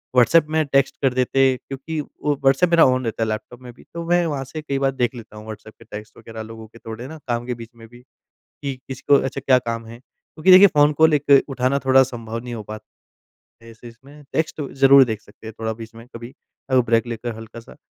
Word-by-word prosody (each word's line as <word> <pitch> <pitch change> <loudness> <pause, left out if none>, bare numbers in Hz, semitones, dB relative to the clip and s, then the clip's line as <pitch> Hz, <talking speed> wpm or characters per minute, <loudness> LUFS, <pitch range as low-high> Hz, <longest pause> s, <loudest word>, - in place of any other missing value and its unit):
WhatsApp 140 +6 +4
में 155 0 +1
text 140 -1 +1
कर 135 -2 +2
देते 130 +1 +2
क्योंकि 140 +5 -7
वो 145 0 -3
व्हाट्सएप 135 +6 +3
मेरा 170 -1 +6
ऑन 130 -1 +1
रहता 115 0 -2
है 110 - -2
लैपटॉप 120 +3 -6
में 125 -1 -10
भी। - - -19
तो 170 0 -6
मैं 175 0 +3
वहाँ 145 -4 -3
से 155 +4 -7
कई 140 -2 -3
बार 135 0 +1
देख 125 -1 -2
लेता 110 -2 -12
हूँ 105 - -11
व्हाट्सएप 110 0 -10
के 115 - -16
टेक्स्ट 105 -1 -10
वग़ैरह 110 -1 -9
लोगों 110 0 -10
के 115 +2 -18
थोड़े 115 +3 -8
ना 160 +3 -9
काम 120 -1 -2
के 125 - -3
बीच 115 - -10
में 115 -1 -14
भी। 120 +1 -17 0.4
कि 140 -2 -7
किसको 135 +2 +2
अच्छा 135 +1 -4
क्या 130 -1 +4
काम 115 -1 -5
है? 115 +1 -11
क्योंकि 155 +6 -2
देखिए 190 +2 +9
फ़ोन 150 -4 +3
कॉल 160 -1 +6
एक 140 -1 +5
उठाना 130 +1 0
थोड़ा 130 0 +6
संभव 115 -3 -6
नहीं 125 -1 -7
हो 110 -2 -6
पात 110 +1 -9 0.8
ऐसे 115 +1 -13
इसमें। 135 +6 -16
टेक्स्ट 160 0 -1
तो 145 -3 -5
ज़रूर 135 0 +7
देख 110 -4 -4
सकते 110 - -17
हैं 110 - -8
थोड़ा 110 0 -2
बीच 115 +1 -11
में 115 +1 -13
कभी 120 +3 -9 0.4
अ, 130 - +3
ब्रेक 115 -1 +2
लेकर 120 0 -5
हल्का-सा। 115 +1 -12
125 Hz, 235 wpm, -21 LUFS, 115-140 Hz, 0.8 s, देखिए